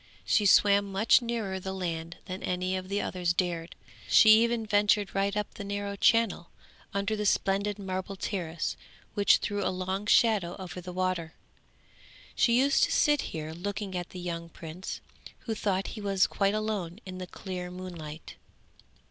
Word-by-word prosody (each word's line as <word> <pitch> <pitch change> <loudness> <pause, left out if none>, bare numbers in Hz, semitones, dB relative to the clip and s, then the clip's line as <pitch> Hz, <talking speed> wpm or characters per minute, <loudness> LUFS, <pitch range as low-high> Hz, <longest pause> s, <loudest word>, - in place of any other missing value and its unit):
She 210 -2 +3
swam 200 0 +5
much 205 +6 +4
nearer 225 -5 -3
the 190 +1 -5
land 170 -2 -4
than 185 0 -6
any 185 +1 -1
of 185 0 -5
the 200 +1 0
others 180 -3 -1
dared; 175 -2 -2 0.3
she 220 - +7
even 235 -1 +1
ventured 205 -1 +2
right 200 +1 0
up 210 - -3
the 205 - -7
narrow 200 0 -3
channel 225 -4 +2 0.4
under 200 +2 -1
the 210 - -2
splendid 200 +1 +1
marble 190 0 -4
terrace 170 -5 -3 0.4
which 200 -1 +5
threw 205 -1 -2
a 185 - +1
long 190 +2 -3
shadow 210 -7 +3
over 180 -2 -7
the 180 +1 -7
water. 180 -3 -2 1.0
She 235 0 +3
used 280 +3 +4
to - - -5
sit 295 -2 +3
here 155 -1 -5
looking 195 +2 -4
at 175 -1 -4
the 180 - -8
young 170 -1 -5
prince, 165 +3 -7 0.4
who 225 - -3
thought 195 -3 -1
he 215 - -7
was 195 -2 +3
quite 200 +1 +1
alone 210 -5 -2
in 185 -1 -7
the 185 - -6
clear 180 -1 -6
moonlight. 170 -4 -8
190 Hz, 165 wpm, -29 LUFS, 180-205 Hz, 1.0 s, she